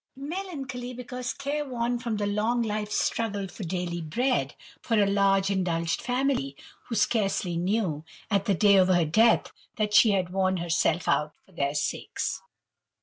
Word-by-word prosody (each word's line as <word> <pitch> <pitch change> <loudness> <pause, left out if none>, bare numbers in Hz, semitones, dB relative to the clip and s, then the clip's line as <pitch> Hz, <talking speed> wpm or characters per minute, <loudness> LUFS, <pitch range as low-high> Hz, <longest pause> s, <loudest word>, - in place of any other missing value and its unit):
Melancholy, 275 -5 -5
because 250 0 -5
care 285 +2 -3
worn 240 -3 -2
from 235 -3 -2
the 205 - -1
long 220 +4 +1
life's 210 -1 -2
struggle 205 -4 -1
for 195 - -9
daily 175 -1 -3
bread, 165 - 0 0.3
for 230 - 0
a 205 - +5
large 195 0 +2
indulged 170 -4 0
family, 250 - -1 0.3
who 230 - -4
scarcely 195 -5 +1
knew, 175 -3 -1 0.3
at 200 -1 +2
the 200 - +2
day 200 +2 +5
of 185 -1 +5
her 175 -3 +3
death, 220 +9 +3 0.2
that 210 -1 -1
she 220 +1 +7
had 185 -2 0
worn 190 0 +1
herself 170 -1 0
out 150 +1 +1
for - - -24
their 140 -4 -2
sakes. 150 - -2
205 Hz, 160 wpm, -27 LUFS, 180-240 Hz, 0.3 s, she